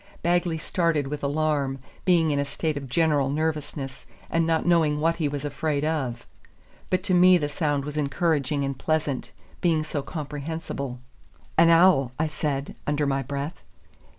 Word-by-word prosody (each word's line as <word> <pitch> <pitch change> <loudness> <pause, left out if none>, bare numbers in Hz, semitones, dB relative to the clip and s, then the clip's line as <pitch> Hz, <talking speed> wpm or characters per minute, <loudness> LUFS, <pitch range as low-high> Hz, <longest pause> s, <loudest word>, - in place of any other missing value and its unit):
Bagley 175 -1 +1
started 165 -2 0
with 145 +1 -4
alarm, 145 -2 0 0.3
being 170 -4 +4
in 145 - +1
a - - +2
state 155 +2 -2
of 140 -2 -6
general 150 -2 +2
nervousness, 145 -2 -3 0.2
and 165 0 +2
not 165 -1 +1
knowing 160 -4 +3
what 165 +2 +1
he 160 -3 0
was 145 0 -4
afraid 145 0 -1
of. 135 -7 -2 0.6
But 185 0 +1
to 195 -2 0
me 180 +1 +7
the 150 -4 -1
sound 145 -1 -1
was 150 +1 -5
encouraging 145 -1 0
and 135 0 -2
pleasant, 155 -2 -1 0.3
being 160 -3 +2
so 150 -1 -3
comprehensible. 145 -3 -5 0.6
"An 165 +1 +6
owl," 165 -7 +5
I 160 - +1
said, 150 -3 -3
under 145 0 +1
my 135 -1 +1
breath. 140 +5 -5
150 Hz, 160 wpm, -25 LUFS, 140-165 Hz, 0.6 s, me